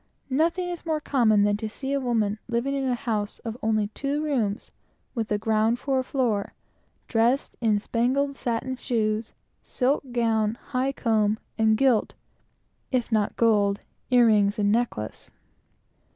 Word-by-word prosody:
Nothing 335 +6 +1
is 350 -1 -6
more 315 -2 -1
common 230 -8 +3
than 205 0 +2
to 220 +1 -4
see 270 +5 -4
a 280 - +1
woman 220 -5 0
living 240 +4 0
in 275 -1 -1
a 250 - +1
house 220 -5 -2
of 225 -1 -3
only 215 -1 +1
two 280 +6 -2
rooms, 235 -9 -1 0.4
and 230 -2 0
the 210 - 0
ground 220 +2 +1
for 265 +1 0
a - - -1
floor, 240 -7 -1 0.5
dressed 235 +4 +1
in 220 -3 +3
spangled 260 +6 0
satin 250 +1 -2
shoes, 220 -2 -1 0.3
silk 265 0 -1
gown, 225 -2 +1
high 260 +1 0
comb, 220 -4 +1 0.2
and 220 -1 +3
gilt, 250 -4 +2 0.8
if 250 -3 0
not 215 -2 +1
gold, 205 -3 +3 0.3
ear 245 -2 +6
rings 205 -2 +3
and 205 -1 +2
necklace. 220 - -2
230 Hz, 150 wpm, -25 LUFS, 215-260 Hz, 0.8 s, ear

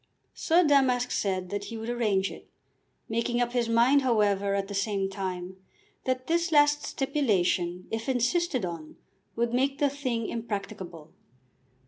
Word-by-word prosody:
Sir 345 +2 +3
Damask 265 -5 +3
said 185 -2 -1
that 205 0 -3
he 225 +3 -6
would 225 +1 -6
arrange 215 -5 0
it, - - -12 0.6
making 235 +2 -1
up 240 0 +1
his 240 -2 0
mind, 240 +5 +4
however, 205 -5 +2
at 195 0 -1
the 200 - -7
same 195 -1 -1
time, 185 -1 -5 0.5
that 255 0 -1
this 335 +2 0
last 295 -1 +5
stipulation, 190 -10 0
if 225 +3 -3
insisted 255 - +1
on, 165 -3 -7 0.4
would 235 0 0
make 270 +2 +1
the 285 -1 +2
thing 255 -5 -2
impracticable. 200 -8 -6
230 Hz, 145 wpm, -28 LUFS, 195-265 Hz, 0.6 s, last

